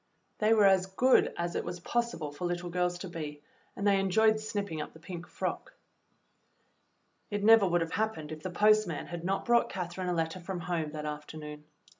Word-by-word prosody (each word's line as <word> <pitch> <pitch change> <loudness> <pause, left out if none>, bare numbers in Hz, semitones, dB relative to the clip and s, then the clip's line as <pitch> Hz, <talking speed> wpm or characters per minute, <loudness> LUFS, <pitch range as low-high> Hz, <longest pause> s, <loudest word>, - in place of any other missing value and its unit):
They 220 +1 +4
were 210 -2 +5
as 190 -1 +4
good 250 +7 +4
as 170 0 -2
it - - -1
was 175 0 -5
possible 235 -7 -2
for 145 +5 -5
little 175 0 -3
girls 180 0 0
to 190 - -6
be, 150 -4 -7 0.3
and 200 - -3
they 200 -1 +4
enjoyed 215 +3 +3
snipping 200 -7 -3
up - - -7
the 160 - -14
pink 170 +1 -8
frock. - - -4 1.5
It 205 -1 -2
never 220 -2 +7
would 175 -1 +2
have 165 0 -2
happened 210 -9 -2
if 155 0 -7
the 185 - -4
postman 210 -3 +3
had 170 -1 -7
not 195 +2 -1
brought 235 -1 +3
Catherine 180 0 -4
a - - +1
letter 165 +1 -1
from 180 0 -5
home 165 -3 -2
that 150 -1 -5
after 150 +1 -6
noon. 150 -1 -8
180 Hz, 200 wpm, -30 LUFS, 165-205 Hz, 1.5 s, never